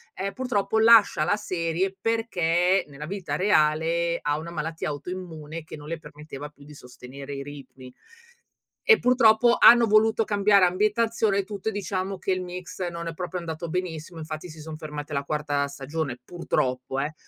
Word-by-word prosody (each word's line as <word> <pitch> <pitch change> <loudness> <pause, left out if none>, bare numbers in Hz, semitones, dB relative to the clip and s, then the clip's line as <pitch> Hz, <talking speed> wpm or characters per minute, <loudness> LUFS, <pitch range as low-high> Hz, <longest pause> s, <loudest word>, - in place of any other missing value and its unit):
ehm, 195 +1 -3
purtroppo 220 -4 0
lascia 220 -8 +6
la 205 - +2
serie 185 -1 -2
perché 185 -5 +1
nella 145 +1 -9
vita 195 +1 -4
reale 170 -2 +2
ha 150 +1 -1
una 170 +1 -7
malattia 160 0 -4
autoimmune 160 0 -7
che 155 - -10
non 150 0 -11
le 165 0 -4
permetteva 150 -1 -9
più 145 -1 -18
di 150 - -13
sostenere 135 +2 -10
i 140 - -5
ritmi. 135 -3 -11 1.0
E 445 -1 +8
purtroppo 240 -1 +5
hanno 235 -1 +8
voluto 220 +1 +3
cambiare 200 -2 +4
ambientazione 210 +2 +1
e 200 - 0
tutto, 205 +2 -4
e - - -9
diciamo 195 -1 -3
che 190 - -3
il 185 0 -1
mix 180 0 -6
non 170 -1 -6
è 165 - -5
proprio 180 +1 -4
andato 165 0 -5
benissimo, 170 -2 -4
infatti 155 +2 -6
si 155 0 -11
son 155 0 -7
fermati 150 -1 -7
alla 140 0 -1
quarta 145 -1 -1
stagione, 140 -1 -4
purtroppo 130 -6 -2
eh. 150 +3 -3
170 Hz, 170 wpm, -25 LUFS, 150-195 Hz, 1.0 s, E